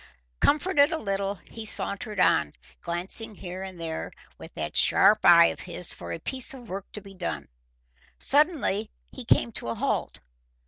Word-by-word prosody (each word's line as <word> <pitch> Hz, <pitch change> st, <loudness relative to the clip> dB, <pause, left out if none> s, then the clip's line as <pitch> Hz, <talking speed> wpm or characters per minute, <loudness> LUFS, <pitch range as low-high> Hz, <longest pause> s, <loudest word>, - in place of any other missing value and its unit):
Comforted 295 Hz, 0 st, +3 dB
a 325 Hz, -, -1 dB
little, 200 Hz, -5 st, -2 dB
he 225 Hz, -, -7 dB
sauntered 210 Hz, -1 st, -2 dB
on, 75 Hz, -, +3 dB, 0.3 s
glancing 190 Hz, +6 st, +1 dB
here 185 Hz, 0 st, -7 dB
and 190 Hz, -2 st, -8 dB
there 160 Hz, -1 st, -5 dB, 0.3 s
with -, -, -11 dB
that -, -, -5 dB
sharp 215 Hz, +1 st, +5 dB
eye 170 Hz, -1 st, +7 dB
of -, -, -16 dB
his 180 Hz, -1 st, -2 dB
for -, -, -9 dB
a -, -, -3 dB
piece 260 Hz, -, -1 dB
of 245 Hz, -4 st, -13 dB
work 195 Hz, +2 st, -7 dB
to 210 Hz, -, -7 dB
be 195 Hz, 0 st, -13 dB
done. 180 Hz, -2 st, -5 dB, 0.7 s
Suddenly 280 Hz, -, +1 dB, 0.2 s
he 255 Hz, -, -8 dB
came 235 Hz, 0 st, +2 dB
to 210 Hz, -, -5 dB
a 115 Hz, -, -3 dB
halt. -, -, -2 dB
200 Hz, 170 wpm, -26 LUFS, 180-245 Hz, 0.7 s, eye